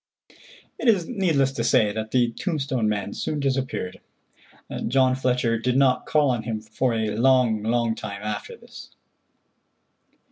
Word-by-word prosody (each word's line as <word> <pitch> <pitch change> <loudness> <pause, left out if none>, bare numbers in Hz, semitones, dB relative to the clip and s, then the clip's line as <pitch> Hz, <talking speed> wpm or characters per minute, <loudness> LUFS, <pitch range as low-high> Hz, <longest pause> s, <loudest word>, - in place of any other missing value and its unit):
It - - -2
is 195 -7 +3
needless 165 - +1
to 120 -3 -3
say 110 -2 +3
that 110 +1 -4
the 120 0 +2
tombstone 135 - -1
man 100 -1 -2
soon 150 - -3
disappeared. 130 -9 -2 0.9
John 130 +1 +3
Fletcher 125 -3 0
did 125 +2 0
not 135 -2 +2
call 150 -3 +3
on 120 -3 -1
him 110 -1 -4
for 115 +3 -1
a 110 -2 -1
long, 120 -2 +3
long 115 +1 +1
time 105 -2 -7
after 105 -1 -5
this. - - -13
120 Hz, 145 wpm, -24 LUFS, 110-135 Hz, 0.9 s, is